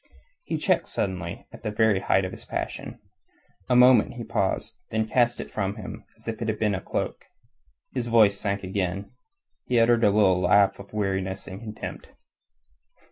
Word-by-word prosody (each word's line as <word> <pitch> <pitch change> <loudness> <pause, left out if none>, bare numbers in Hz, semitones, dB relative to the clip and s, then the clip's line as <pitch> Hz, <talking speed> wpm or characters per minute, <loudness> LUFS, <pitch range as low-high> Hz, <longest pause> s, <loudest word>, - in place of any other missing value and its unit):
He - - -2
checked - - +1
suddenly 90 -4 -3
at - - -12
the - - -2
very 105 -1 +3
height 95 0 +2
of 95 - -4
his - - -10
passion. - - -5 0.7
A 125 - +4
moment 125 -2 +6
he 120 - -5
paused, 110 -4 -2
then 110 0 0
cast 120 +1 +2
it - - -6
from 100 -1 -2
him 110 - -8
as - - -15
if 110 0 -4
it 115 - -2
had 110 -1 -1
been 105 -1 +1
a 95 - -2
cloak. - - -3 0.7
His 125 -2 -2
voice 110 -4 +5
sank 100 -1 -1
again. 95 +1 -3 0.6
He 125 -2 +3
uttered 115 0 +4
a 105 - +6
little 100 -3 +4
laugh 100 +2 +4
of 100 - -11
weariness 95 -2 -2
and 95 +1 -8
contempt. 110 -2 -7
105 Hz, 180 wpm, -26 LUFS, 95-115 Hz, 0.7 s, moment